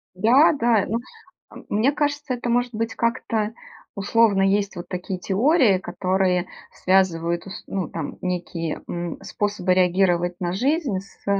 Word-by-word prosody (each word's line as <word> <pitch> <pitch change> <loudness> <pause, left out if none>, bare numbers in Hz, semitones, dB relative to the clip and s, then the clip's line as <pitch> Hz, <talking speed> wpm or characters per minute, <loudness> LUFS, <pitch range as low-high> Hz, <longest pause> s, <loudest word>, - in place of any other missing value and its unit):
Да 240 - +5
да. 235 -7 +2
Ну, 225 - -1 0.6
м, - - -12
мне 220 +7 +2
кажется, 290 -1 -1
это 240 -1 -3
может 245 0 +1
быть 225 +1 -3
как-то 230 -2 -1 0.4
условно. 200 0 +3
Есть 200 +1 +1
вот 175 - -7
такие 180 0 -5
теории, 225 - +3
которые 185 0 0 0.2
связывают, 170 -3 +1
ус 195 +2 -8
ну, 190 -5 -3
там 160 -3 -5
некие, 175 -3 -3
м, 175 -1 -4
способы 200 -3 -1
реагировать 180 -1 +2
на 175 -1 -2
жизнь 260 - 0
с 195 - -17
195 Hz, 140 wpm, -23 LUFS, 180-230 Hz, 0.6 s, Да